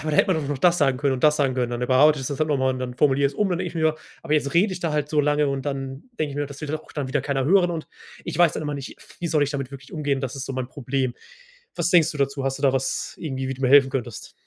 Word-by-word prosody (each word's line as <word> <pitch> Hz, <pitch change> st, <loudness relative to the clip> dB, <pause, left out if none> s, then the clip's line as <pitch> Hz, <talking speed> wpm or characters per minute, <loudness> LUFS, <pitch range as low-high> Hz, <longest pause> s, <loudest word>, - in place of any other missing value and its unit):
„Aber 155 Hz, -, -3 dB
da 150 Hz, -, 0 dB
hätte 190 Hz, -, +4 dB
man 155 Hz, -4 st, -2 dB
noch 145 Hz, -, -2 dB
das 175 Hz, +4 st, +4 dB
sagen 135 Hz, -2 st, +2 dB
können 140 Hz, 0 st, +1 dB
und 125 Hz, -, -6 dB
das 150 Hz, 0 st, +5 dB
sagen 135 Hz, -3 st, +1 dB
können.” 125 Hz, -2 st, -1 dB
Dann 120 Hz, 0 st, -3 dB
überarbeite 145 Hz, +4 st, +5 dB
ich 130 Hz, -, -4 dB
das 140 Hz, 0 st, -4 dB
halt 155 Hz, 0 st, +1 dB
nochmal 130 Hz, -3 st, +1 dB
und 130 Hz, -, -5 dB
dann 125 Hz, -1 st, -4 dB
formuliere 140 Hz, 0 st, +3 dB
ich 140 Hz, -, -3 dB
es -, -, -15 dB
um, 210 Hz, -2 st, +2 dB
dann 180 Hz, -, -1 dB
denke 180 Hz, 0 st, -2 dB
ich -, -, -12 dB
mir: 160 Hz, -1 st, +2 dB, 0.3 s
„Aber 165 Hz, -, -3 dB
jetzt 145 Hz, -1 st, +1 dB
rede 190 Hz, +4 st, +3 dB
ich 180 Hz, -, -6 dB
da 165 Hz, -3 st, -1 dB
halt 150 Hz, -1 st, -1 dB
so 150 Hz, 0 st, +2 dB
lange.” 150 Hz, 0 st, +2 dB
Und 135 Hz, 0 st, -3 dB
dann 135 Hz, -1 st, -4 dB
denke 150 Hz, -2 st, -1 dB
ich 140 Hz, -, -7 dB
mir: 145 Hz, -, -1 dB
„Das 140 Hz, 0 st, -10 dB
will 150 Hz, -, -5 dB
dann 155 Hz, +2 st, -2 dB
auch -, -, -17 dB
dann 140 Hz, -3 st, -3 dB
wieder 140 Hz, +2 st, 0 dB
keiner 135 Hz, -1 st, -1 dB
hören.” 180 Hz, +2 st, +4 dB
Und 165 Hz, -2 st, -4 dB, 0.4 s
ich -, -, -4 dB
weiß 175 Hz, -3 st, +5 dB
dann -, -, -4 dB
immer 150 Hz, -1 st, -3 dB
nicht, 140 Hz, -2 st, -7 dB
f -, -, -17 dB
wie 175 Hz, -, -2 dB
soll 155 Hz, -2 st, +2 dB
ich 145 Hz, -, 0 dB
damit 140 Hz, -3 st, -4 dB
wirklich 135 Hz, +2 st, -11 dB
umgehen, 145 Hz, -5 st, -1 dB
das 135 Hz, 0 st, -4 dB
ist 135 Hz, -, -5 dB
so -, -, -4 dB
mein 130 Hz, -1 st, -3 dB
Problem. 130 Hz, -2 st, -2 dB, 0.6 s
Was 170 Hz, +1 st, +1 dB
denkst 170 Hz, -4 st, +5 dB
du 150 Hz, -, -8 dB
dazu? 140 Hz, 0 st, -1 dB
Hast 135 Hz, +1 st, -1 dB
du -, -, -10 dB
da 135 Hz, -2 st, +4 dB
was, 135 Hz, 0 st, -2 dB
irgendwie, 135 Hz, -4 st, -4 dB
wie 135 Hz, -, -2 dB
du 135 Hz, -, -9 dB
mir 130 Hz, -, +3 dB
helfen 135 Hz, 0 st, +6 dB
könntest? 120 Hz, -4 st, -5 dB
140 Hz, 335 wpm, -24 LUFS, 135-155 Hz, 0.6 s, helfen